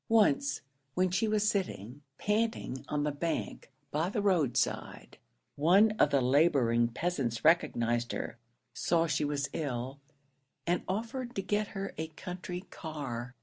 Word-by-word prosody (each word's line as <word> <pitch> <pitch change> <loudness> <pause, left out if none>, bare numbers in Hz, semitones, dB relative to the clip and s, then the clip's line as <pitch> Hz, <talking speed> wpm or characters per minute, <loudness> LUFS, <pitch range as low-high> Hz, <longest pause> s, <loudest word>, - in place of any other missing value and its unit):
Once 270 +6 +3 0.3
when 185 0 +2
she 220 +5 +1
was 215 0 +2
sitting, 145 - -2 0.2
panting 210 - -1
on 150 -1 0
the 150 - +1
bank 145 -1 -3 0.2
by 160 +4 0
the 210 - -1
road 170 - +2
side, - - -2 0.4
one 190 +9 +5
of - - +6
the 140 -2 +3
labouring 125 -4 +4
peasants 120 -4 -2
recognised 120 -7 +3
her 120 - -4 0.3
saw 165 -1 +2
she 150 -2 0
was 145 -1 0
ill 135 -2 -3 0.7
and 175 +1 +1
offered 235 +5 -3
to 195 - 0
get 210 +1 0
her 195 0 -3
a 160 - -2
country 180 +2 -6
car. 130 -7 -5
160 Hz, 145 wpm, -31 LUFS, 135-195 Hz, 0.7 s, of